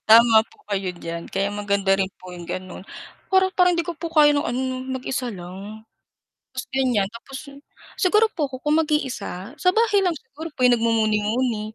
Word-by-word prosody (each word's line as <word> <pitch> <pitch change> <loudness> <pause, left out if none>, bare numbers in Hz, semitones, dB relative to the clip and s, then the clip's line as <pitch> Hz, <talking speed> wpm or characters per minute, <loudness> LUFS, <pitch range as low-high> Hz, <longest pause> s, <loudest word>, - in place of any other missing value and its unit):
Tama 225 0 +7
po - - -25
kayo 190 -2 -1
diyan 170 -1 -6
kaya 195 +1 -1
maganda 200 -1 -1
rin 190 - +2 0.2
po 185 - -9
yung 175 -1 -9
gano'n 185 +1 -6 0.4
para 380 0 +3
parang 360 -1 +3
hindi 340 - +1
ko 340 -1 -6
po 335 - -4
kayo 305 -3 +5
ng 290 0 +1
ano 245 +2 -1 0.3
mag-isa 260 0 -3
lang 195 +4 -9 0.7
tapos 255 - -4
gan'yan, 245 -7 +2
tapos 240 +4 -9 0.6
siguro 420 +4 +4
po 300 -5 -1
ku 260 - -6
kung 300 +1 +2
mag-iisa 255 - -3
sa 365 - +4
bahay 440 -3 +3
lang 355 -2 +1
siguro 290 +4 -9
po 255 - -3
yung 245 -1 +5
nagmumuni-muni, 220 0 0
240 Hz, 180 wpm, -23 LUFS, 200-300 Hz, 0.7 s, Tama